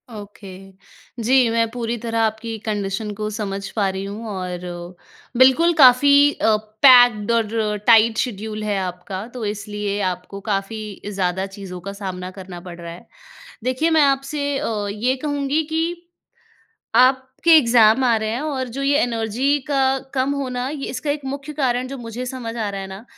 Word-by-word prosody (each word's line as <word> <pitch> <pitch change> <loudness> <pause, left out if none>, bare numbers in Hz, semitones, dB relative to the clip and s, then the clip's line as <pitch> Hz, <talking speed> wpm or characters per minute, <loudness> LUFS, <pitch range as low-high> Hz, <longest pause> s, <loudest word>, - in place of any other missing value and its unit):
Okay. 195 -2 -11 0.5
जी, 255 0 +4
मैं 230 0 +1
पूरी 235 -1 -3
तरह 230 -1 -2
आपकी 220 0 -1
कंडीशन 210 0 -2
को 215 +1 -4
समझ 200 -2 -4
पा 200 -3 +1
रही 190 0 -4
हूँ 210 +3 -7
और 185 -2 -4 0.8
बिल्कुल 290 +7 +5
काफ़ी 280 +3 +7
अ, 220 -1 +2 0.3
पैक्ड 245 -4 +6
और 220 -2 0
टाइट 225 -1 +6
शेड्यूल 215 -2 -3
है 210 -1 -1
आपका। 185 +2 -5
तो, 245 -3 -6
इसलिए 205 0 -3
आपको 180 +2 -8
काफ़ी 210 +1 -4
ज़्यादा 190 -1 -1
चीज़ों 180 -3 -8
का 200 - -6
सामना 185 -2 -6
करना 185 -2 -9
पड़ 175 0 -10
रहा 170 0 -7
है। 170 - -12 0.6
देखिए, 255 +6 0
मैं 320 -1 +4
आपसे 280 +1 0
अ, 210 -2 -2
ये 240 +5 0
कहूँगी 290 +1 0
कि, 340 +2 -2 0.9
आपके 260 +6 +4
एग्ज़ाम 235 -2 +5
आ 235 -2 +3
रहे 220 0 -2
हैं, 235 - -2
और 275 -4 -3
जो 270 +4 -5
ये 280 +1 +2
एनर्जी 240 +4 0
का 270 -1 +2 0.2
कम 265 +1 +1
होना, 255 -2 -3
ये 285 -2 -5
इसका 285 +2 -3
एक 290 -1 -3
मुख्य 280 +2 -5
कारण 255 -4 0
जो 275 0 -7
मुझे 235 +1 -6
समझ 240 -2 -6
आ 215 -3 -2
रहा 195 -1 -5
है 195 - -6
ना, 190 +4 -10
230 Hz, 170 wpm, -21 LUFS, 205-265 Hz, 0.9 s, काफ़ी